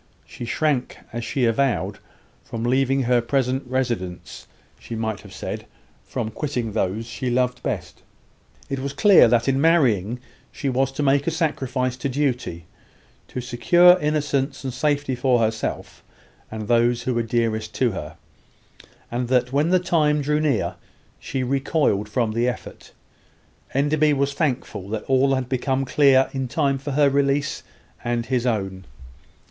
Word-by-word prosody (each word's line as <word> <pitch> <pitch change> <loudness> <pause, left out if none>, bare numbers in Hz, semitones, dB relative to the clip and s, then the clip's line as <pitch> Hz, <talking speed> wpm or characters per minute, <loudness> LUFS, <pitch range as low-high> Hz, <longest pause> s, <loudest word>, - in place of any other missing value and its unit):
She 120 - -8
shrank, 140 0 -1 0.2
as 120 0 -4
she 135 -1 0
avowed, 120 +3 0 0.4
from 115 0 -6
leaving 135 +2 +2
her 120 0 +3
present 130 +2 0
residence 105 -10 -3 0.3
she 115 - -7
might 110 -2 -2
have - - -14
said, - - -6 0.4
from 115 -4 -3
quitting 125 -4 -3
those 105 +3 -1
she 120 +2 -4
loved 125 0 0
best. - - -4 0.7
It 135 - -3
was 140 +1 -4
clear 205 - +6
that 115 +1 +2
in 135 0 +2
marrying 125 - +3 0.3
she 140 - -3
was 135 +1 +1
to 145 - -2
make 140 +1 +2
a - - +5
sacrifice 130 -6 -1
to 130 +2 -2
duty 125 - -2 0.6
to 125 - -5
secure 175 +9 +5
innocence 145 -2 -1
and 130 -2 -4
safety 145 0 0
for 125 0 +2
herself 110 -1 -2 0.5
and 110 -1 -6
those 120 0 +2
who 125 - -1
were 120 - +1
dearest 110 -2 -1
to 125 -3 +2
her; 80 -4 -7 0.9
and 120 +1 -2
that, 125 0 +1
when 145 +4 +2
the 185 - +5
time 155 -5 +1
drew 150 +2 +1
near, 145 -8 0 0.4
she 135 -1 -3
recoiled 130 -5 0
from 115 -1 0
the 115 +2 0
effort. 125 - -8 0.8
Enderby 150 +2 +3
was 140 0 0
thankful 125 - -2
that 110 0 -3
all 135 +1 +3
had 130 -2 -2
become 130 +1 -1
clear 135 -1 +4
in 135 -1 -2
time 140 0 0
for 140 +1 -5
her 145 +1 +4
release 140 +1 +1 0.4
and 120 -1 -1
his 125 0 0
own. 95 -5 -2
130 Hz, 155 wpm, -23 LUFS, 120-140 Hz, 0.9 s, clear